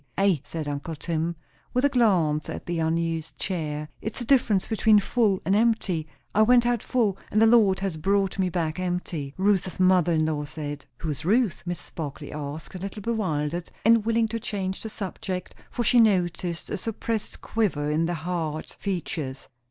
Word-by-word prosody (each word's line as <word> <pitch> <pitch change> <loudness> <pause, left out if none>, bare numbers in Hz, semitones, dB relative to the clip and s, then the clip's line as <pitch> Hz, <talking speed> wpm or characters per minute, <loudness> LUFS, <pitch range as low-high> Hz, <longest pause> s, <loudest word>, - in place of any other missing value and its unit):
"Ay," 195 -7 +3
said 155 -1 -5
uncle 145 +3 -4
Tim, 165 +2 -2 0.4
with 250 +2 +3
a - - +5
glance 180 - +2
at - - -6
the 175 -1 -2
unused 165 0 -1
chair, 150 -5 -3
"it's 220 - -4
the 240 - -4
difference 225 -7 +3
between 220 -1 +4
full 205 -1 +2
and 190 +4 +3
empty. 210 -8 +1 0.3
'I 215 - +4
went 240 +2 +6
out 240 -2 +1
full, 215 -7 0
and 215 - +2
the 225 - +7
Lord 220 -5 +5
has 190 -5 -2
brought 195 +3 +1
me 185 -1 +2
back 165 -1 -2
empty', 175 -6 -3
Ruth's 190 -2 +1
mother 185 -2 +4
in 155 -1 +2
law 150 -2 -1
said." 145 0 -6
"Who 160 +2 -3
is 150 +1 -5
Ruth?" 215 +3 +2
Mrs. 175 -1 -5
Barclay 145 -2 -6
asked, 150 +3 -6
a 185 - -6
little 200 +2 -6
bewildered, 175 -7 -1 0.2
and 230 -1 +6
willing 230 0 +2
to 230 +1 -2
change 190 -3 -3
the 220 - -5
subject; 185 -3 -5 0.2
for 240 - -2
she 240 +2 +5
noticed 180 -5 +1
a - - -1
suppressed 225 +2 -3
quiver 160 -10 0
in 160 +2 +1
the 175 - -1
hard 160 -2 -3
features. 155 -8 -3
185 Hz, 185 wpm, -26 LUFS, 160-215 Hz, 0.4 s, the